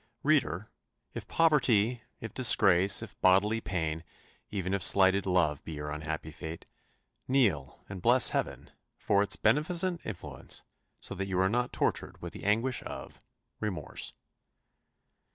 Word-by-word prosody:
Reader, 115 - +1 0.4
if 110 -3 -7
poverty, 125 -8 +2 0.2
if 110 -2 -7
disgrace, 95 -6 +4
if - - -12
bodily 105 +4 +3
pain, 80 -5 -3 0.5
even 95 -2 -3
if 100 - 0
slighted 95 +1 +4
love 85 -5 +1
be 80 - -7
your 75 0 -5
unhappy 80 +1 -5
fate, 80 +2 -8 0.6
kneel 105 - 0
and 95 -2 -8
bless 120 +4 +5
Heaven - - -3 0.3
for 100 0 +1
its 100 - +2
beneficent 170 +8 +1
influence, 110 -5 -5 0.4
so - - -3
that 95 +1 -4
you 95 -1 -1
are 95 0 +3
not 125 +3 -1
tortured - - -2
with 85 0 -8
the 105 - -9
anguish 115 +4 +1
of - - -9 0.4
remorse. 105 -4 -5
100 Hz, 135 wpm, -30 LUFS, 90-120 Hz, 0.6 s, bless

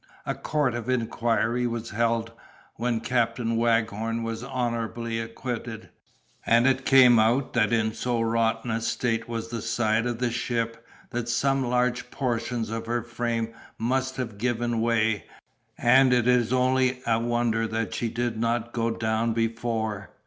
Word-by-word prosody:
A - - -1
court 150 -5 0
of 120 0 -4
inquiry 120 0 0
was 115 -1 -4
held, 115 +1 0 0.4
when 115 -1 -1
Captain 120 -1 0
Waghorn 115 0 0
was 115 0 -4
honorably 115 -3 -2
acquitted, 115 0 -5 0.5
and 115 +1 +4
it 135 0 +2
came 125 -3 +7
out, 120 +5 +2
that 110 -3 +2
in 110 -2 +1
so 120 0 -1
rotten 115 0 0
a 115 +1 -1
state 115 0 -1
was 115 -1 -4
the 115 -1 -4
side 115 0 +1
of 120 -1 -2
the 120 0 0
ship, 115 -1 -2 0.3
that 120 0 -3
some 135 +2 +1
large 125 0 0
portions 120 -3 -2
of 115 0 -4
her 120 -1 -1
frame 120 -1 -2 0.2
must 130 +3 -1
have 115 -6 -5
given 120 -1 0
way, 115 -2 +1 0.5
and 130 +2 +5
it 120 -1 +2
is 125 -2 +3
only 130 0 +2
a 115 -1 +2
wonder 120 -1 0
that 110 0 -2
she 115 - -1
did 120 -1 -2
not 115 0 -1
go 115 0 0
down 115 0 0
before. 115 -3 -2
115 Hz, 155 wpm, -26 LUFS, 115-120 Hz, 0.5 s, came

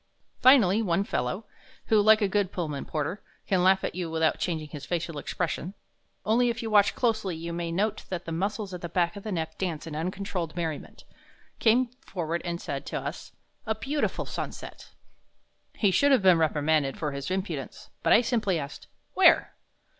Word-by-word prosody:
Finally 225 -6 +6
one 185 -2 +1
fellow 190 - -2 0.4
who, 215 -2 +4
like 215 +1 +6
a - - +3
good 200 -1 0
Pullman 155 -6 -3
porter, 155 +6 -3 0.2
can 190 -2 +2
laugh 190 +1 +4
at - - -2
you 175 -1 -3
without 160 -1 +1
changing 160 -4 -2
his 145 -2 -8
facial 165 -1 -3
expression, 180 +4 -3 0.5
only 240 +3 +3
if 230 0 -3
you 225 - -3
watch 205 -1 +5
closely 220 -7 0
you 170 +1 -5
may 170 0 -3
note 200 +5 -1
that 180 -1 -4
the 165 - -5
muscles 200 +3 -2
at 180 - -6
the 170 - -5
back 170 +2 +1
of 200 - -7
the 215 - -5
neck 160 -3 -3
dance 170 -5 -3
in 160 -2 -6
uncontrolled 180 0 -3
merriment 165 -4 -5 0.6
came 240 +3 +4 0.2
forward 170 -2 -3
and 170 -1 -3
said - - -4
to - - -4
us: - - -7 0.3
"A 220 - +1
beautiful 275 +7 -2
sunset." - - -7 0.9
He 200 -3 +2
should 280 +10 +4
have 260 -7 +4
been 185 -3 +6
reprimanded 155 -2 +1
for 150 -2 -2
his 140 +1 -5
impudence, 185 -8 -4
but - - +1
I 225 - +7
simply 220 -7 0
asked, 145 -2 -7 0.3
"Where?" - - +5
180 Hz, 185 wpm, -27 LUFS, 160-210 Hz, 0.9 s, I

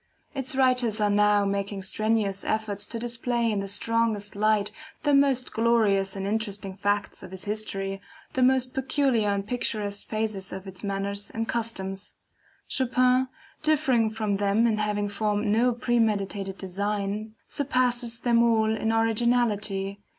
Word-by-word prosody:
Its 265 -2 -3
writers 250 -4 +3
are 210 -1 +2
now 205 0 +4
making 200 0 -2
strenuous 210 -1 0
efforts 210 -2 -2
to 230 - -3
display 235 0 -1
in 205 - 0
the 195 - -3
strongest 220 0 0
light, 210 0 +2 0.3
the 290 -1 +2
most 275 -2 +3
glorious 215 -4 +2
and 195 0 -4
interesting 205 -2 -2
facts 205 0 -1
of - - -10
its 190 -1 -6
history, 195 -2 -2 0.3
the 260 - 0
most 255 0 +3
peculiar 265 -5 +1
and 200 0 -1
picturesque 210 -3 -2
phases 215 -3 -3
of 190 0 -7
its 190 0 -8
manners 200 0 -3
and 225 0 -3
customs. 195 -4 -3 0.5
Chopin, 255 0 +2 0.3
differing 280 -7 +2
from 215 -2 -1
them 205 +3 +2
in 220 -2 +1
having 210 -1 0
formed 205 +1 -1
no 225 +4 +3
premeditated 210 -5 0
design, 205 +3 -3
surpasses 250 -4 +1
them 235 -1 +3
all 220 -2 +3
in 220 0 0
originality. 220 -3 +1
215 Hz, 145 wpm, -26 LUFS, 200-235 Hz, 0.5 s, now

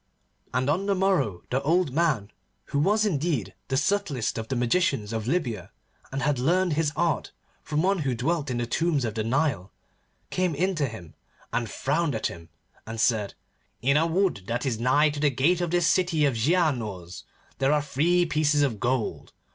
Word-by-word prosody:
And 130 +1 0
on 180 +7 0
the 200 - +2
morrow 185 - +1
the 130 +2 +1
old 165 -1 +1
man, 140 -10 +1 0.4
who 140 - +2
was 210 +7 +3
indeed 155 - -1
the 135 - 0
subtlest 150 - 0
of 110 - -5
the 130 - -2
magicians 120 - +1
of 110 0 -3
Libya 120 - -1 0.4
and 135 +1 -3
had 145 -3 +1
learned 175 +6 +2
his 150 -1 +1
art 170 -2 0 0.3
from 150 +1 -1
one 195 0 +2
who 135 -5 -1
dwelt 160 +3 -1
in 125 - -2
the 120 - -1
tombs 150 +1 0
of 110 - -3
the 110 - -2
Nile, 115 - 0 0.6
came 180 -4 0
in 185 +6 +1
to 150 -5 0
him 90 -9 -10 0.4
and 120 -2 -1
frowned 145 +3 0
at 110 - -3
him, 85 -1 -5 0.4
and 110 0 -5
said, 110 -4 +1 0.5
'In 140 +3 +3
a 160 +2 +3
wood 170 - 0
that 120 +3 -2
is 120 -5 -1
nigh 145 +5 +3
to 145 - -6
the 145 0 +3
gate 150 +7 +2
of 175 - -1
this 175 0 +2
city 170 -3 +2
of 140 - +2
Giaours 115 - -1 0.4
there 135 +1 +3
are 150 -1 +2
three 170 +5 +2
pieces 155 -2 +2
of 120 -7 -1
gold. 120 0 -2
145 Hz, 190 wpm, -26 LUFS, 120-170 Hz, 0.6 s, was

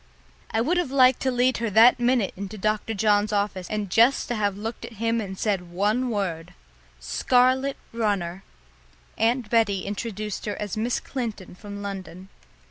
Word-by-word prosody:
I 225 - 0
would 335 +9 +1
have 350 -6 0
liked 255 -2 +5
to 260 - 0
lead 250 0 +2
her 230 -1 -1
that 230 +4 +6
minute 240 -4 +1
into 200 +2 -7
Dr. 215 +2 -1
John's 205 0 +2
office 200 -3 -1
and 210 -1 -2
just 235 +7 +4
to 240 - -1
have 205 -2 -1
looked 225 +3 -6
at - - -8
him 230 +1 0
and 190 -2 -6
said 190 -5 -1
one 210 +8 0
word 185 -7 -3 0.4
"Scarlet 255 - +2 0.2
runner!" 195 -5 -1 0.8
Aunt 230 0 +1
Betty 215 -5 +2
introduced 210 0 -4
her 205 - -2
as 210 0 -4
Miss 230 +3 -1
Clinton 225 -9 -5
from 205 +2 -9
London. 190 -2 -7
215 Hz, 165 wpm, -25 LUFS, 200-240 Hz, 0.8 s, that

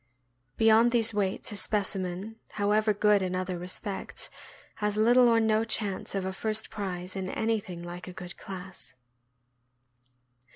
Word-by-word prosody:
Beyond 225 +2 +5
these 230 -2 +3
weights 200 +1 0
a - - -5
specimen, 195 0 -1 0.2
however 215 +1 +2
good 210 0 +3
in 185 -1 -1
other 185 -1 -2
respects, 185 +2 -3 0.5
has 210 0 -1
little 240 +3 +6
or 230 -1 +5
no 220 0 +3
chance 210 -4 -2
of 195 -1 -1
a 190 - -2
first 220 +2 0
prize 185 -3 -4
in 190 -1 -3
anything 205 -7 -2
like 175 +1 -7
a - - -6
good 180 -1 -8
class. 185 -6 -8
205 Hz, 140 wpm, -29 LUFS, 185-220 Hz, 0.5 s, little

